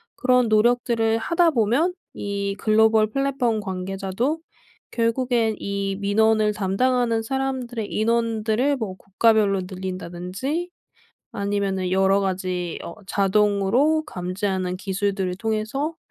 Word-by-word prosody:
그런 250 -2 +3
노력들을 225 0 +2
하다 335 +7 +2
보면 265 - +2 0.2
이 200 -1 -3
글로벌 220 0 +4
플랫폼 255 -2 0
관계자도 195 - -2 0.5
결국엔 230 -1 +1
이 200 -1 -2
민원을 215 +1 +2
담당하는 230 +3 +1
사람들의 255 -3 -3
인원들을 230 +4 +1
뭐 205 -6 -4
국가별로 200 -1 +2
늘린다든지 185 - -4 0.6
아니면은 200 -2 -1
여러 195 +1 +3
가지 185 -2 -2
어 170 - -8
자동으로 210 +9 +2
감지하는 185 0 -3
기술들을 195 -1 -2
통해서 225 +9 -2
215 Hz, 275 characters per minute, -23 LUFS, 195-240 Hz, 0.6 s, 글로벌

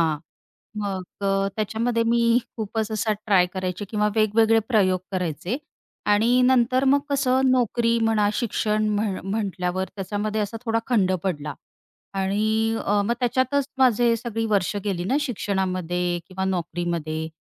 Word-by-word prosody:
हां. 160 -2 +1 0.6
मग 190 -2 -3 0.2
अ, 195 0 +1
त्याच्यामध्ये 230 +2 0
मी 235 0 +3 0.2
खूपच 220 0 -2
असा 215 0 0
ट्राय 190 -4 +4
करायचे 185 +1 -3
किंवा 210 -1 +1
वेगवेगळे 220 +1 +4
प्रयोग 185 -5 +3
करायचे. 180 - -2 0.5
आणि 230 +5 +4
नंतर 255 0 +3
मग 280 +2 +5
कसं, 265 -1 +2
नोकरी 235 -1 +2
म्हणा 220 -2 +2
शिक्षण 215 -2 0
म्ह 205 -2 -1
म्हटल्यावर 190 -2 -2
त्याच्यामध्ये 210 +2 -2
असा 210 +2 -3
थोडा 225 0 +1
खंड 205 -7 +2
पडला. 150 -6 -2 0.6
आणि 215 +3 +1
अ, 205 0 +2
मग 235 - +1
त्याच्यातच 260 +3 +1
माझे 240 -2 +4
सगळी 225 0 -3
वर्ष 200 0 +1
गेली 190 -4 -2
ना 245 +10 0
शिक्षणामध्ये 185 - -1
किंवा 190 0 -3
नोकरीमध्ये. 170 -3 -2
210 Hz, 135 wpm, -24 LUFS, 190-230 Hz, 0.6 s, मग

